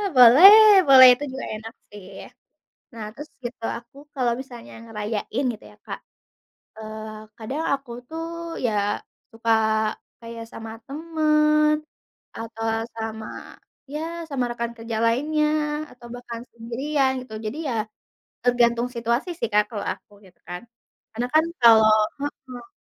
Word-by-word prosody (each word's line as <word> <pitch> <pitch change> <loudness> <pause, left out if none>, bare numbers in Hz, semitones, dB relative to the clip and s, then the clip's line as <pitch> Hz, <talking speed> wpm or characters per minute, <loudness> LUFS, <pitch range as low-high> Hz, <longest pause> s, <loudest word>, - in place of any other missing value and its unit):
Boleh, 385 - +9
boleh 260 -1 +10
itu 290 - -7
juga 265 - -6
enak 225 +1 -9 0.2
sih. 205 -2 -12 0.9
Nah, 225 -2 -7
terus 295 +3 -10
gitu, 240 -1 -7 0.2
aku 235 +3 -20 0.2
kalau 250 -3 +1
misalnya 245 -3 -11
ngerayain 220 +3 -4
gitu 215 - -15
ya, - - -21
Kak, - - -6 0.8
eee, 215 0 -8
kadang 265 +8 -4
aku 275 -3 -5 0.2
tuh, 325 +2 -5 0.4
ya 225 - +1 0.6
suka 225 0 -1 0.7
kayak 230 0 -8
sama 225 0 -8
temen, 305 0 +2 0.7
atau 225 0 -6 0.3
sama, 220 -1 -5 0.7
ya 300 - -3 0.3
sama 260 -3 -1
rekan 235 0 -4
kerja 225 0 -5
lainnya, 300 +6 +1 0.5
atau 245 -1 -14
bahkan 240 -1 -8
sendirian 265 +5 -1
gitu. 235 -4 -11
Jadi 270 +9 -5
ya, 240 - -2 0.7
tergantung 240 -1 +2
situasi 235 +8 -1
sih, - - 0
Kak, 210 0 +4
kalau 210 - -5
aku, - - -22
gitu 185 -1 -21
kan. 180 0 -6 0.5
Karena 240 +3 -2
kan 315 +1 +5 0.2
kalo 225 -2 +8 0.4
heeh. 255 -4 -7
240 Hz, 130 wpm, -23 LUFS, 225-280 Hz, 0.9 s, boleh